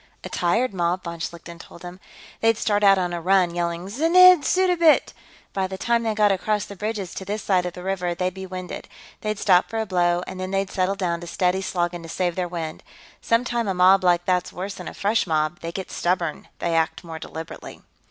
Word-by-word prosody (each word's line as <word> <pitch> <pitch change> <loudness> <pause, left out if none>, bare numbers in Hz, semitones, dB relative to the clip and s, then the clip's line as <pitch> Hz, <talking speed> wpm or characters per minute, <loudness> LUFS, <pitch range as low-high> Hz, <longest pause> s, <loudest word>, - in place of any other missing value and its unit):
"A - - -6
tired 220 +7 0
mob," 175 0 -1
von 170 -1 -6
Schlichten 170 0 -7
told 170 - -13
him. 180 +1 -9 0.4
"They'd 225 -1 +3
start 210 -1 0
out 195 -1 +6
on 180 -1 -1
a 170 - -3
run, 185 -1 +3
yelling 170 0 -2
'Znidd 335 - +6
Suddabit!' 355 -3 +3 0.4
By 190 -1 0
the 190 0 -6
time 235 +4 +1
they 220 -2 -1
got 210 -1 +4
across 205 +2 0
the 200 - -10
bridges 210 -2 -4
to - - -6
this 205 +3 -4
side 180 -2 +1
of 175 - -6
the 180 - -9
river, 180 -2 -2
they'd 180 +1 -1
be 190 0 -7
winded. 185 -1 -7 0.3
They'd 215 -1 -2
stop 185 -3 +3
for 225 - -4
a 220 - 0
blow, 175 -2 +1
and 185 0 -8
then 185 0 -3
they'd 195 0 -1
settle 185 +1 0
down 175 -3 -2
to 175 - -8
steady 180 +2 0
slogging 175 -2 -2
to 165 - -10
save 175 0 -1
their 180 -1 -1
wind. 165 -3 -5 0.4
Sometimes 235 -1 0
a 190 - -1
mob 185 +2 +5
like 175 -1 +3
that's 180 -1 0
worse 195 +3 -5
than - - -9
a - - -7
fresh 205 +1 +1
mob. 155 +1 0
They 165 - -5
get 190 +2 -6
stubborn; 175 -3 -1
they 170 - -2
act 165 +2 0
more 165 -2 -7
deliberately." 160 +1 -9
185 Hz, 220 wpm, -23 LUFS, 175-205 Hz, 0.4 s, out